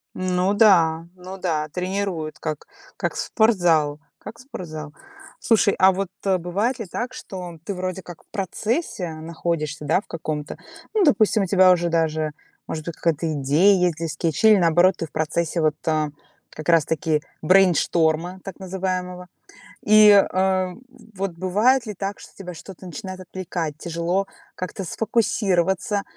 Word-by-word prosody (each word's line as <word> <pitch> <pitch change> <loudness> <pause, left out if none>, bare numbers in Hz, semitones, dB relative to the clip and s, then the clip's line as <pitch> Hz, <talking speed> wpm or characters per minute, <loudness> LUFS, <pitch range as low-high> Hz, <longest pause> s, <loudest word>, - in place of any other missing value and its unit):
Ну 185 +1 0
да, 170 -7 +4
ну 185 +1 -9
да, 160 -5 -1
тренирует 180 -2 -3
как, 155 -2 -5 0.3
как - - -2
спортзал, 170 -10 +2 0.2
как 225 +2 -10
спортзал. 155 - -8 0.5
Слушай, 215 -3 +3
а 190 0 +6
вот, 195 +1 -2 0.2
э, 190 -1 +3
бывает 200 +9 -1
ли 225 - -4
так, 240 +7 -5
что 180 -8 -8
ты 200 - -4
вроде 185 +1 -4
как 175 -2 -12
в - - -37
процессе 205 - -2
находишься, 155 -2 -4
да, 160 +6 +2
в - - -27
каком-то, 155 -2 -5 0.4
ну, 430 -2 +3
допустим, 220 - +3
у - - 0
тебя 185 0 +5
уже 175 -1 +2
даже, 160 -2 0 0.4
может 155 -1 -5
быть, 170 - -5
какая-то 165 -1 -1
идея 155 +8 +3
есть 180 -2 +2
для 165 0 -3
скетчей, 165 +7 +2
или, - - +5
наоборот, 175 +2 +4
ты - - -3
в 155 - -15
процессе 160 +2 -1
вот, 155 -1 +2
а, 155 -1 +1 0.4
как 155 - -9
раз-таки 160 -2 +2 0.2
брейншторма 175 -1 +3
так 195 - -9
называемого. 185 -1 -4 0.6
И, 215 0 +7
э, 200 -1 +7
в 185 -1 0 0.4
вот 195 0 -2
бывает 210 +9 +2
ли 210 - -5
так, 195 +2 -5
что - - -13
тебя 180 -2 -8
что-то 185 +3 -11
начинает 185 +2 -7
отвлекать, 175 -4 -5
тяжело 170 +4 -1 0.3
как-то 185 +1 -5
сфокусироваться, 200 -2 0
180 Hz, 155 wpm, -23 LUFS, 160-195 Hz, 0.6 s, И